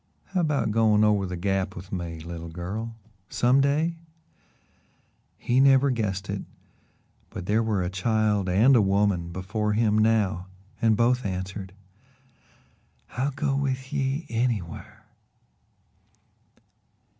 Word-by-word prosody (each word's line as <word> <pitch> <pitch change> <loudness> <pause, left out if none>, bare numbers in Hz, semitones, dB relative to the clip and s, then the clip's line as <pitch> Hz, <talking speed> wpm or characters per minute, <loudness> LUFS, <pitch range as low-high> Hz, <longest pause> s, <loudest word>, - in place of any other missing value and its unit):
"How 185 - +2
about 150 -8 0
going 110 -1 +3
over 105 -2 +3
to - - -6
the 90 - -4
Gap 95 +1 -1
with 90 +2 -10
me, 85 -3 -4
little 85 0 -7
girl 100 +7 -5 0.3
some 125 +3 +3
day?" 155 +4 +1 1.4
He 125 +2 +1
never 135 0 +5
guessed 105 -5 -2
it, 100 0 -3 0.9
but - - -7
there 105 +4 +2
were 105 -4 0
a 90 - -2
child 105 0 +1
and 110 +9 +5
a 115 - +6
woman 100 -3 +1
before 105 +4 -2
him 110 -1 +2
now 105 -4 +1 0.3
and 110 -2 +3
both 125 +2 +2
answered: 95 0 -5 1.4
"I'll 130 +3 -1
go 140 0 -1
with 130 -1 -2
ye 135 +4 -1
anywhar." 115 -8 -3
105 Hz, 125 wpm, -26 LUFS, 95-125 Hz, 1.4 s, a